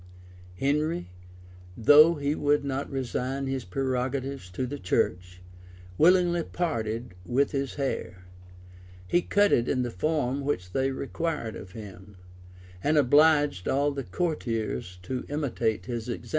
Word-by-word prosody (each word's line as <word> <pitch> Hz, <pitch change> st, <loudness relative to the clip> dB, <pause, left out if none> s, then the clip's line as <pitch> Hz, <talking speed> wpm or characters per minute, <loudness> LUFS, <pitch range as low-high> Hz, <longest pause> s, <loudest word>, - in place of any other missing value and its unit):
Henry, 140 Hz, -, 0 dB, 0.7 s
though 150 Hz, +8 st, +7 dB
he 145 Hz, -1 st, -1 dB
would 145 Hz, -1 st, +1 dB
not 140 Hz, 0 st, -3 dB
resign 135 Hz, +1 st, -2 dB
his 135 Hz, -1 st, -2 dB
prerogatives 130 Hz, +1 st, -2 dB
to 90 Hz, +8 st, -3 dB
the 140 Hz, +3 st, -5 dB
church 90 Hz, 0 st, -1 dB, 0.5 s
willingly 175 Hz, -, +4 dB
parted 115 Hz, -, -3 dB
with 130 Hz, +7 st, +1 dB
his 140 Hz, -2 st, -2 dB
hair: 135 Hz, -9 st, -3 dB, 0.8 s
he 175 Hz, -, +3 dB
cut 205 Hz, +3 st, +3 dB
it 120 Hz, -, +2 dB
in 130 Hz, -2 st, +1 dB
the 120 Hz, -, -3 dB
form 140 Hz, -, -1 dB
which 90 Hz, -11 st, -2 dB
they 135 Hz, +4 st, +1 dB
required 140 Hz, -3 st, -3 dB
of 90 Hz, -, -10 dB
him, 100 Hz, -2 st, -11 dB, 0.7 s
and 155 Hz, +1 st, +2 dB
obliged 145 Hz, -, +4 dB
all 140 Hz, +2 st, +2 dB
the 140 Hz, -1 st, -4 dB
courtiers 115 Hz, -, -3 dB
to 130 Hz, +6 st, -4 dB
imitate 125 Hz, -7 st, -1 dB
his 120 Hz, -1 st, -4 dB
example. 120 Hz, -, -5 dB
135 Hz, 130 wpm, -27 LUFS, 115-145 Hz, 0.8 s, though